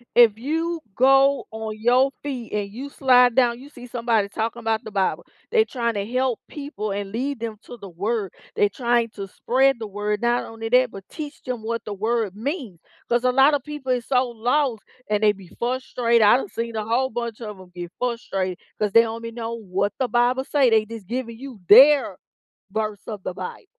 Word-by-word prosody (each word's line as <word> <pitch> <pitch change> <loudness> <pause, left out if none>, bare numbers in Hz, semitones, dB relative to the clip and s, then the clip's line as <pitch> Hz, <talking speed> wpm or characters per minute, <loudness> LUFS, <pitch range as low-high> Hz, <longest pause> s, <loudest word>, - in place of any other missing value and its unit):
If 230 -3 +6
you 325 +6 -2 0.2
go 270 +2 +4
on 220 -1 -6
your 250 +4 +3
feed 255 -5 -5
and 205 -1 -2
you 265 +6 -7
slide 250 -3 +4
down, 240 -2 +3
you 280 - -12
see 250 -4 -12
somebody 230 -4 0
talking 225 +3 -3
about 225 -1 -1
the 220 - -8
Bible. 195 -2 0 0.3
They 445 -2 +5
trying 235 - -2
to 200 -2 -2
help 250 +1 0
people 280 -8 -5
and 200 0 -4
lead 260 +4 -2
them 225 -1 -5
to 245 - -10
the 200 - -10
word. 200 +2 -3 0.2
They 205 - +4
trying 235 +2 0
to 195 -2 -7
spread 265 +6 +2
the 220 - -5
word, 205 +1 -2
not 240 0 +1
only 225 0 -7
that, 250 0 +4
but 195 -1 -10
teach 300 -2 -8
them 250 -4 -4
what 230 0 -3
the 210 - -4
word 220 -1 -1
means, 240 - -4 0.3
'cause 240 0 +1
a 255 - +3
lot 270 +3 +5
of 280 -3 0
people 295 -3 -5
is 245 -2 -2
so 255 -1 +2
lost, 240 0 0 0.3
and 210 0 +1
they 210 - +6
be 195 -3 -12
frustrated 240 -2 0
I 210 - +7
done 325 - -5
seen 230 -4 -4
the 220 -1 -2
whole 245 +4 +1
bunch 235 -1 -4
of 210 -3 -6
'em 185 -1 -14
get 175 -1 -7
frustrated 195 -7 -2 0.2
'cause 210 -1 0
they 230 +3 +7
don't 225 0 -5
be 230 0 -6
know 230 0 -5
what 200 -2 -2
the 260 - +1
Bible 245 +2 +2
say, 270 -2 +3
they 220 -1 +4
just 220 -3 -9
giving 230 0 -4
you 260 -5 -9
their 275 +6 +7 0.5
verse 215 -1 -3
of 210 -3 -6
the 180 - -4
Bible, 465 - -7
235 Hz, 210 wpm, -23 LUFS, 215-255 Hz, 0.5 s, I